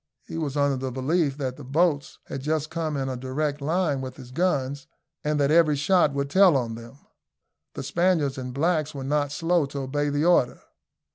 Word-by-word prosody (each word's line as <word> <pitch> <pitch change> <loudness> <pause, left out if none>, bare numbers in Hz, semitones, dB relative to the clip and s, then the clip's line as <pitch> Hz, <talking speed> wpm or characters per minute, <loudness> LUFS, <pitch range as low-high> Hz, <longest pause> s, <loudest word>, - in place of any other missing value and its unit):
He - - -8
was 150 -3 -3
under 140 -1 +2
the 130 0 -3
belief 140 +3 0
that 130 -3 -3
the 145 - -9
boats 145 +2 0
had 135 - -6
just 155 +1 -1
come 160 -3 -2
in 135 -1 -2
a 130 - -3
direct 140 +3 -2
line 155 -2 0
with 130 -1 -6
his 125 -2 -11
guns, 140 -4 -1 0.4
and 150 0 0
that 140 0 +2
every 160 -2 +5
shot 165 +2 +3
would 140 0 -1
tell 180 0 +5
on 120 -3 -2
them. 115 +3 -10 0.8
The - - -5
Spaniards 165 -7 +1
and 125 0 -5
blacks 155 +2 0
were 135 - -5
not 145 +1 0
slow 165 0 +1
to 140 0 -5
obey 145 +2 -1
the 145 +2 0
order. 170 -8 +3
145 Hz, 200 wpm, -25 LUFS, 135-155 Hz, 0.8 s, every